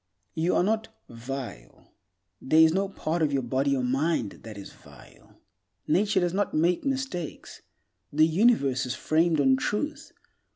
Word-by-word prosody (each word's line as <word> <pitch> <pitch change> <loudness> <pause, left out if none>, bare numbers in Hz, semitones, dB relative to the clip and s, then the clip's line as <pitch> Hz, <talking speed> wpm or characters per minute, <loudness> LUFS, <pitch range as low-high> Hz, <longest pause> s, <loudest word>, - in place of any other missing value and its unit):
You 165 +2 0
are - - +3
not 220 +3 0 0.2
"vile." 115 - -8 0.5
There 155 +4 +3
is 160 0 +6
no 195 +1 0
part 170 -3 -3
of 155 -2 +2
your 135 -2 0
body 135 +3 0
or 130 - -1
mind 130 -3 -1
that 110 -2 -10
is 100 - -10
vile. - - -18 0.5
Nature 195 +4 +2
does 175 -1 0
not 200 +1 -1
make 170 +3 +1
mistakes. 265 - -4 0.5
The 155 +2 +4
Universe 155 - +2
is 125 - -3
framed 160 0 +1
on 135 -2 +4
Truth. 295 - -3
160 Hz, 155 wpm, -26 LUFS, 130-190 Hz, 0.5 s, is